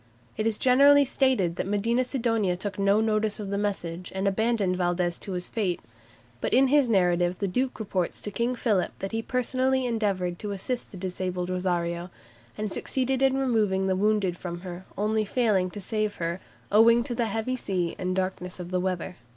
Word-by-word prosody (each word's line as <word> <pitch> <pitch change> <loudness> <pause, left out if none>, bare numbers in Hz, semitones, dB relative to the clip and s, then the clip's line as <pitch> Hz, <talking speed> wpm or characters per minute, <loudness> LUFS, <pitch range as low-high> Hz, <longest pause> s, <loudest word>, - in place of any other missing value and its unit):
It 215 +1 0
is 220 -2 0
generally 280 +3 +6
stated 255 -10 +1
that - - -2
Medina 230 +5 +1
Sidonia 225 -8 0
took 200 +2 -5
no 200 +2 +3
notice 215 -1 0
of 200 -2 -5
the 200 - 0
message, 180 -4 -3
and 190 +1 0
abandoned 205 -2 +1
Valdes 175 -1 0
to 195 - -5
his 180 0 -3
fate, 195 -6 -1 0.6
but - - +1
in 265 +1 +5
his 285 -3 +4
narrative 180 -3 +2
the 200 - -1
Duke 255 +8 -1
reports 190 -4 -2
to 205 - -5
King 235 +4 -1
Philip 215 -6 0
that 195 - -5
he 225 - -1
personally 255 +2 0
endeavoured 195 -7 -1
to 205 -1 -4
assist 240 +6 -3
the 190 - -10
disabled 180 -1 -3
"Rosario," 175 -1 -1 0.5
and 210 -2 -3
succeeded 265 0 -1
in 270 0 +3
removing 215 -8 +1
the 190 -1 +1
wounded 200 -2 +1
from 175 -1 -6
her, 180 0 -8
only 215 +2 +1
failing 205 -4 +1
to 205 - -8
save 215 +1 -2
her 170 +1 -3 0.3
"owing 230 +3 +6
to 240 - -4
the 235 -1 0
heavy 225 +4 -2
sea 185 -8 -2
and 185 - -2
the 185 +1 +1
darkness 185 -1 -5
of 180 0 -7
the 185 - +1
weather." 185 -1 -3
200 Hz, 190 wpm, -27 LUFS, 180-230 Hz, 0.6 s, generally